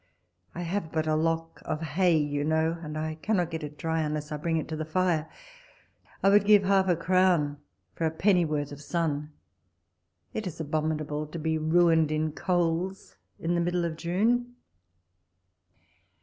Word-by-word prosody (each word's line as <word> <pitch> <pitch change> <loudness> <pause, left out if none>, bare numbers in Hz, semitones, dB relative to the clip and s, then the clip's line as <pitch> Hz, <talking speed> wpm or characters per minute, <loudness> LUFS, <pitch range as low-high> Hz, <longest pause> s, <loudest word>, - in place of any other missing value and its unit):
I 175 - -4
have 175 -1 -3
but 160 -1 0
a 155 - +1
lock 165 +1 -1
of 155 - -3
hay, 165 +2 +2
you 145 -1 0
know, 160 +2 +1
and 155 -2 -6
I 155 0 -3
cannot 180 -6 0
get 160 0 -4
it 150 0 -7
dry, 160 0 -1
unless 150 0 -3
I 150 - -2
bring 165 +2 -1
it 155 - -3
to 160 - -3
the 155 - -3
fire. 160 -1 0 0.9
I 195 - +6
would 205 0 +6
give 205 -1 +6
half 195 0 +3
a 175 - +3
crown 170 -4 +2 0.3
for 165 - 0
a - - +1
pennyworth 160 -5 +1
of 145 0 -9
sun. 150 -2 -2 1.0
It 215 -3 -3
is 170 -2 -7
abominable 155 -1 -2
to 160 - -7
be 160 0 -1
ruined 160 -1 +3
in 155 0 0
coals 175 +3 -1 0.2
in 170 +1 -1
the 170 - +1
middle 175 0 0
of 165 -1 -3
June. 225 +9 0
160 Hz, 170 wpm, -28 LUFS, 155-180 Hz, 1.0 s, I